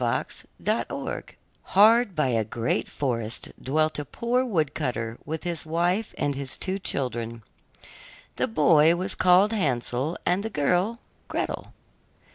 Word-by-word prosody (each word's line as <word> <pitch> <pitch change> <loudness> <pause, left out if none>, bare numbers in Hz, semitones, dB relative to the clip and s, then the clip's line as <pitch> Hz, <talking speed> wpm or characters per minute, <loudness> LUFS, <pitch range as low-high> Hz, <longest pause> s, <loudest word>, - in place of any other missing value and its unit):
HANSEL - - -2 0.2
AND - - +1
GRETEL - - -4 0.4
Hard 215 +1 +5
by 150 -4 +2
a 115 -2 +2
great 115 +2 -1
forest 115 -5 -2
dwelt 155 +3 +1
a - - -2
poor 240 - 0
wood 165 - 0
cutter 115 -2 -3
with 160 +1 -4
his 175 -2 -2
wife 175 +7 0
and 145 - 0
his 135 -1 -6
two 190 +1 -2
children. 115 - -3 0.9
The - - +1
boy 155 +6 +5
was 185 +2 -2
called 185 +4 +4
Hansel 135 - -1
and 180 +2 +2
the 220 - -3
girl 180 - +1 0.3
Gretel. - - -3
155 Hz, 140 wpm, -26 LUFS, 130-185 Hz, 0.9 s, Hard